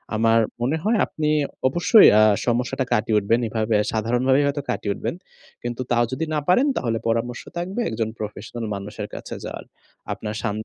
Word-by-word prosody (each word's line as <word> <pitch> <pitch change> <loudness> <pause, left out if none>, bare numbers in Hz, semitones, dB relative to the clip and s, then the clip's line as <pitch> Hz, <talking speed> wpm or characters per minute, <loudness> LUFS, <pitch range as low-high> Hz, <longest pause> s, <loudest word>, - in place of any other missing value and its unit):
আমার 115 +1 +4 0.2
মনে 135 +7 +1
হয় 220 +2 +2
আপনি 155 -1 -2 0.4
অবশ্যই 175 - +6
আ - - +7 0.3
সমস্যাটা 125 +2 0
কাটিয়ে 110 0 +2
উঠবেন। 110 +4 +1
এভাবে 110 0 0 0.2
সাধারণভাবেই 125 +5 +2
হয়তো 140 0 -1
কাটিয়ে 100 - -1
উঠবেন। - - -4 0.5
কিন্তু 120 +1 -4
তাও 120 0 +4
যদি 145 +5 -2
না 150 - +1
পারেন 245 +11 +4
তাহলে 115 -2 -1
পরামর্শ 115 +1 -1 0.2
থাকবে 185 +7 -3
একজন 110 0 -2
প্রফেশনাল 110 +2 -6
মানুষের 100 +1 -6
কাছে - - -7
যাওয়ার। - - -7 0.5
আপনার 105 -1 -5
শা 115 - -1
120 Hz, 165 wpm, -23 LUFS, 110-140 Hz, 0.5 s, আ